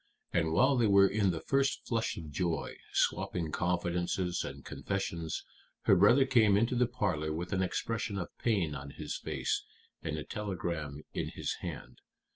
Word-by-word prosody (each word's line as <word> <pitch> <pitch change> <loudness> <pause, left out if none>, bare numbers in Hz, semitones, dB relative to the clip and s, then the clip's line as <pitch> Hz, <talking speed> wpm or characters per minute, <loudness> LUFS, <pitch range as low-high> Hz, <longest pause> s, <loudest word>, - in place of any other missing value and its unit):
"And 80 -2 +2
while 130 - +4
they 115 -2 +4
were 100 -1 +7
in 100 -1 +2
the 85 -3 -2
first 135 0 +1
flush 115 -2 -1
of 80 -3 -7
joy, 85 +2 -1 0.2
swapping 85 -3 0
confidences 90 +1 0
and - - -7
confessions, 80 -2 -3 0.4
her - - +5
brother 115 +9 +6
came 110 -7 +5
into 115 +4 +2
the 125 0 +3
parlor 95 -11 -1
with 85 +4 -3
an 95 - +1
expression 105 +2 -1
of 90 -3 -5
pain 95 -10 +1
on 70 0 -6
his - - -5
face - - -1 0.4
and 75 0 -3
a 75 - -4
telegram 85 -8 -4
in - - -2
his - - -3
hand. - - -7
90 Hz, 165 wpm, -32 LUFS, 80-110 Hz, 0.4 s, were